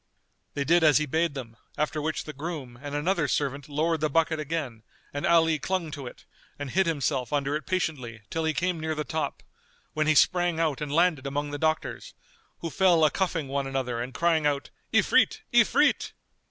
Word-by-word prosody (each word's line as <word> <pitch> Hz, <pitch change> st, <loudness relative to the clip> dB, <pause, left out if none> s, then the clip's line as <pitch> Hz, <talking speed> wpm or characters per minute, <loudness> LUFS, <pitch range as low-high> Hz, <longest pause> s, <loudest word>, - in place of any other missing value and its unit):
They 140 Hz, -, 0 dB
did 170 Hz, +3 st, +4 dB
as 150 Hz, -3 st, +6 dB
he 155 Hz, -, +1 dB
bade 160 Hz, +1 st, 0 dB
them; 115 Hz, -4 st, -7 dB, 0.2 s
after 150 Hz, +1 st, -1 dB
which 155 Hz, +1 st, -2 dB
the 150 Hz, -, -8 dB
groom 140 Hz, -5 st, -6 dB
and 145 Hz, 0 st, -5 dB
another 165 Hz, +1 st, +1 dB
servant 140 Hz, 0 st, -2 dB
lowered 155 Hz, +2 st, 0 dB
the 155 Hz, -, +1 dB
bucket 160 Hz, +1 st, +1 dB
again 145 Hz, -7 st, -4 dB, 0.3 s
and 145 Hz, -, -1 dB
Ali 165 Hz, -2 st, +4 dB
clung 185 Hz, -3 st, -2 dB
to 140 Hz, -4 st, -6 dB
it -, -, -12 dB, 0.3 s
and 145 Hz, -2 st, -5 dB
hid 190 Hz, +3 st, +2 dB
himself 140 Hz, -5 st, -1 dB
under 145 Hz, 0 st, 0 dB
it 155 Hz, -, -5 dB
patiently 135 Hz, -, -2 dB
till 165 Hz, -, -1 dB
he 160 Hz, 0 st, +1 dB
came 180 Hz, -1 st, 0 dB
near 160 Hz, 0 st, -2 dB
the 150 Hz, -, -2 dB
top, 160 Hz, 0 st, -3 dB, 0.5 s
when 155 Hz, 0 st, 0 dB
he 155 Hz, -, +4 dB
sprang 175 Hz, +1 st, +3 dB
out 155 Hz, -4 st, 0 dB
and 150 Hz, -1 st, -3 dB
landed 160 Hz, -3 st, +2 dB
among 145 Hz, +1 st, -2 dB
the 145 Hz, -, -4 dB
doctors, 155 Hz, 0 st, -2 dB, 0.5 s
who 165 Hz, -, -4 dB
fell 175 Hz, -4 st, +4 dB
a 150 Hz, -, +3 dB
cuffing 175 Hz, -6 st, -1 dB
one 140 Hz, 0 st, -2 dB
another 130 Hz, -3 st, -2 dB
and 125 Hz, +2 st, -5 dB
crying 165 Hz, -2 st, +2 dB
out, 140 Hz, -1 st, -2 dB, 0.2 s
"Ifrit! -, -, +3 dB
Ifrit!" -, -, +3 dB
155 Hz, 195 wpm, -27 LUFS, 140-165 Hz, 0.5 s, as